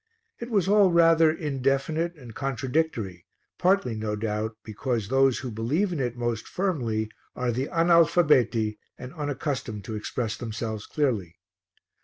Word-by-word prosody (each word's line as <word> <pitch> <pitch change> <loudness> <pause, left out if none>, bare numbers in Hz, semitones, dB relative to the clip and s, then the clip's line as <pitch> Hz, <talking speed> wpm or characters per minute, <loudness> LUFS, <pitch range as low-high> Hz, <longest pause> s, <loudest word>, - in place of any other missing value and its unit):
It 235 - -6
was 200 -6 +1
all 200 -2 +5
rather 165 -1 +5
indefinite 150 +3 -1
and 125 -7 -12
contradictory, 130 - -2 0.3
partly, 185 - +2
no 110 -1 -2
doubt, 110 +1 -3
because 110 0 -2
those 135 -1 +3
who 130 -2 -5
believe 145 - 0
in 160 - -3
it 120 -2 -2
most 120 -2 -2
firmly 120 - -1 0.2
are 125 -1 0
the 130 +4 -2
analfabeti 165 -10 +3 0.2
and 125 +2 -9
unaccustomed 140 - -3
to 110 - -6
express 110 +1 -3
themselves 110 -2 -5
clearly. 110 - -1
130 Hz, 135 wpm, -26 LUFS, 110-160 Hz, 0.3 s, all